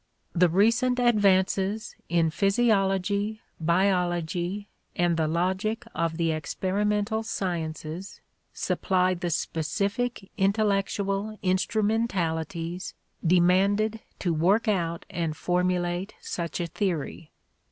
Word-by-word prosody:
The 180 0 +4
recent 230 +8 +3
advances 200 -3 +2
in 165 -2 +2
physiology, 200 +1 +1 0.2
biology, 175 +2 0 0.3
and 175 -1 +2
the 160 -1 +1
logic 190 +8 -1
of 165 0 -1
the 165 -1 +1
experimental 205 +7 -1
sciences 170 -3 -4 0.3
supply 185 -1 +1
the 175 -1 -3
specific 200 +8 -2
intellectual 200 +1 0
instrumentalities 185 -4 -1 0.3
demanded 195 +5 +3 0.2
to 175 -3 0
work 190 +9 +2
out 170 -5 0
and 165 -3 -3
formulate 180 +1 0
such 170 -2 -4
a 175 - 0
theory. 165 -3 -3
185 Hz, 90 wpm, -27 LUFS, 170-205 Hz, 0.3 s, The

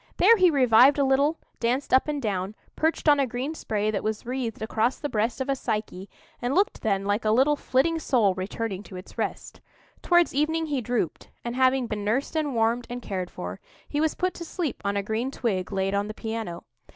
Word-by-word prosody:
There 460 - +7
he 370 -4 +5
revived 260 -1 +6
a 285 - +3
little, 280 +4 +2 0.2
danced 250 +4 0
up 260 - +5
and 295 -1 -1
down, 200 -4 -2 0.2
perched 320 0 0
on 290 -1 +6
a 275 - +2
green 250 +6 -3
spray 215 -8 -1
that 205 - -2
was 215 +1 -3
wreathed 240 -3 -3
across 225 +3 0
the 290 - -4
breast 225 +3 -1
of 265 - -2
a 275 - +1
Psyche, 210 -6 -4 0.3
and 245 +4 -1
looked 395 +3 +1
then 195 -2 0
like 205 +2 0
a 215 - +1
little 265 +7 +4
flitting 305 +5 +1
soul 230 -10 +2
returning 195 +2 -4
to 205 - -12
its 180 +1 -10
rest. - - -4 0.4
Towards 345 -1 +3
evening 320 +3 +1
he 285 -4 -1
drooped; 235 -8 -2 0.2
and, 235 0 -3
having 260 0 +3
been 210 -3 -4
nursed 240 +10 -1
and 295 -5 0
warmed 230 +1 +1
and 245 +1 -4
cared 185 -6 -4
for, 90 +1 -7 0.3
he 295 - -1
was 315 -1 +1
put 365 0 0
to 340 - -7
sleep 330 -4 -4
on 200 0 0
a 200 - 0
green 220 +5 -2
twig 210 -9 -2
laid 195 0 0
on 200 +1 0
the 215 - -7
piano. 220 -6 -5
240 Hz, 215 wpm, -26 LUFS, 210-280 Hz, 0.4 s, There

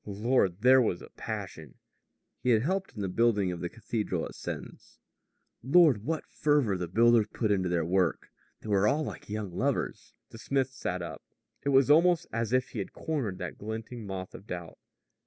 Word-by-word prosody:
Lord, 105 -2 +1
there 130 +2 +7
was 90 -7 -1
a - - -13
passion! 80 -5 -7 0.7
He 125 - 0
had 115 -2 +4
helped 190 +5 -2
in 105 - -5
the - - -1
building 105 -1 +2
of 85 - -5
the 85 - -3
cathedral 105 -6 -3
at - - -8
Sens. - - -8 0.6
Lord, 140 - +5
what 160 +4 -2
fervor 145 -9 +1
the 90 -1 -3
builders 115 +3 +4
put 110 -3 0
into 95 -3 +1
their 85 -2 0
work! 90 0 0 0.3
They - - -10
were 100 0 +3
all 150 +7 +2
like 105 - -7
young 105 -4 -4
lovers. 135 +6 -2 0.2
The 115 - -11
smith 135 +1 0
sat 90 -8 -4
up. 85 - -7 0.4
It 140 - -1
was 135 +1 +5
almost 170 +2 +5
as 115 -1 -1
if 130 0 +1
he 110 - -6
had 100 - -5
cornered 135 - -3
that 90 -1 -6
glinting 110 +1 -6
moth 95 -1 -6
of 100 - -12
doubt. 85 -2 -7
110 Hz, 190 wpm, -29 LUFS, 95-130 Hz, 0.7 s, there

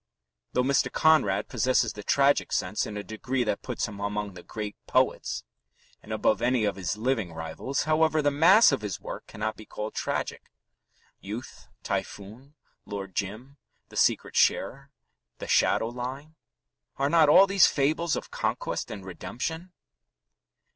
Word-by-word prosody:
Though 125 - +2
Mr. 135 +1 +2
Conrad 155 -12 +3
possesses 125 -1 +1
the 105 - -8
tragic 140 +6 +2
sense - - -1
in 105 - -6
a 105 - -4
degree 125 +4 -2
that 105 -3 -2
puts - - -3
him 105 -2 -9
among 100 0 -3
the 90 - -10
great 105 +1 -6
poets, - - +1 0.6
and 110 - -12
above 110 0 +1
any 120 -2 +2
of 100 - 0
his 95 +1 -3
living 110 -6 -1
rivals, 80 +12 -3
however, 155 0 +2
the 145 -1 +2
mass 175 +10 +6
of 135 - -1
his 105 -4 -4
work - - -8
cannot 110 0 -4
be 110 - -13
called 105 0 -5
tragic. - - -3 0.7
Youth, 110 +5 -8 0.2
Typhoon, 115 +9 -5 0.3
Lord 100 -2 -6
Jim, 110 +9 -5 0.3
The - - -14
Secret - - +1
Sharer, 135 +1 +1 0.5
The - - -7
Shadow 115 - +3
Line 130 +5 -6 0.6
are 140 - +1
not 160 0 +5
all 190 +6 +8
these 195 -3 +5
fables 155 +4 +1
of - - -6
conquest - - -2
and 100 -3 -7
redemption? 160 - -5
120 Hz, 155 wpm, -27 LUFS, 105-145 Hz, 0.7 s, all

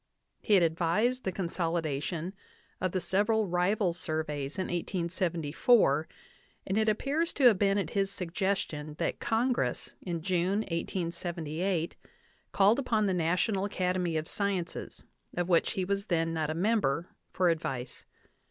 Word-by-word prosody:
He 210 - +3
had 185 - +5
advised 175 +10 +1
the 190 - 0
consolidation 170 -1 -2 0.5
of 185 - 0
the 185 - 0
several 210 +4 +2
rival 180 +1 +1
surveys 155 -3 -3
in 190 - 0
1874, 170 - +1 0.6
and 190 - -1
it 220 0 +3
appears 285 +10 +1
to 280 - -2
have 230 -7 +7
been 200 -1 +3
at 185 -5 -1
his 195 -1 +1
suggestion 180 -5 -2
that - - -1
Congress, 240 +2 0
in 170 -3 -4
June, 185 +3 +1
1878, 170 -1 -2 0.6
called 205 +6 +4
upon 220 -5 +1
the 195 - +1
National 180 +4 +1
Academy 180 -4 0
of 155 0 -3
Sciences, 195 -4 -3 0.3
of 175 -1 0
which 170 -2 +3
he 185 - -1
was 200 +1 -1
then 165 -4 0
not 155 -2 -1
a 155 - -2
member, 175 -5 +1 0.2
for 180 -1 +2
advice. 135 -6 -3
180 Hz, 140 wpm, -30 LUFS, 165-200 Hz, 0.6 s, have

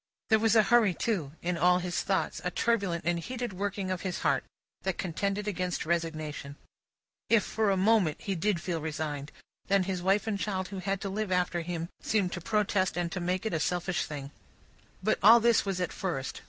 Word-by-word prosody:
There 220 - +6
was 225 0 +3
a 220 - +7
hurry, 215 -4 +4
too, 165 -12 -1
in 175 -1 -1
all 180 +1 +5
his 180 -1 -2
thoughts, - - -1
a - - 0
turbulent 200 -8 0
and 175 0 +1
heated 245 +3 -4
working 195 0 -2
of 185 - -2
his 185 -2 -3
heart, 140 -4 +2 0.4
that 190 -2 -2
contended 200 +4 -2
against 180 -4 -2
resignation. 155 -4 -2 0.7
If, 225 -3 +5
for 220 -2 0
a 195 - +2
moment, 195 -5 +3
he 195 - -2
did 190 +1 0
feel 170 -2 -3
resigned, 150 -2 -4 0.4
then 195 -1 +3
his 185 -1 -2
wife 195 +3 +2
and 210 -3 -1
child 190 -2 -2
who 195 -1 -5
had 195 +1 -2
to 195 - -3
live 205 0 -2
after 180 -1 +1
him, 170 -1 -4
seemed 200 -4 +1
to 175 - -4
protest 200 -2 +1
and 175 -1 -1
to 185 - -3
make 180 +3 -1
it 220 - -1
a 160 - +1
selfish 180 +2 -1
thing. 140 -2 -6 0.7
But, 215 +2 +2
all 225 +4 +9
this 235 -1 +3
was 195 -2 -2
at 180 - -2
first. 165 -9 -3
185 Hz, 205 wpm, -29 LUFS, 170-205 Hz, 0.7 s, all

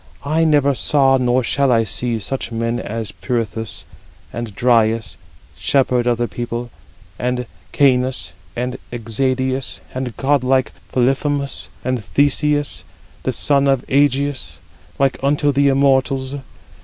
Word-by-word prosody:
I 160 +3 +2
never 145 -3 +3
saw, 135 0 +3
nor 125 0 +2
shall 135 +2 +2
I 115 -2 +4
see, 115 +5 -2
such 120 +3 -4
men 115 +1 -1
as 110 -1 -4
Pirithous, 115 -3 -4 0.5
and 120 -4 -5
Dryas, 115 -2 +2 0.4
shepherd 125 -3 +1
of 120 -1 +2
the 120 0 0
people, 120 0 -5 0.5
and 125 0 -1 0.3
Cæneus, 130 -2 +2 0.2
and 125 +1 -3
Exadius, 130 +3 -1
and 130 -4 -4
god 140 -1 +2
like 130 0 +2 0.2
Polyphemus, 140 +2 0
32 - - -5
and 125 -4 -1
Theseus, 145 - +1 0.4
the - - -1
son 140 -1 +2
of 135 -2 +2
Ægeus, 140 0 +1 0.4
like 135 -2 +1
unto 145 +1 +2
the 140 +1 +3
immortals. 135 0 +2
130 Hz, 130 wpm, -19 LUFS, 120-140 Hz, 0.5 s, I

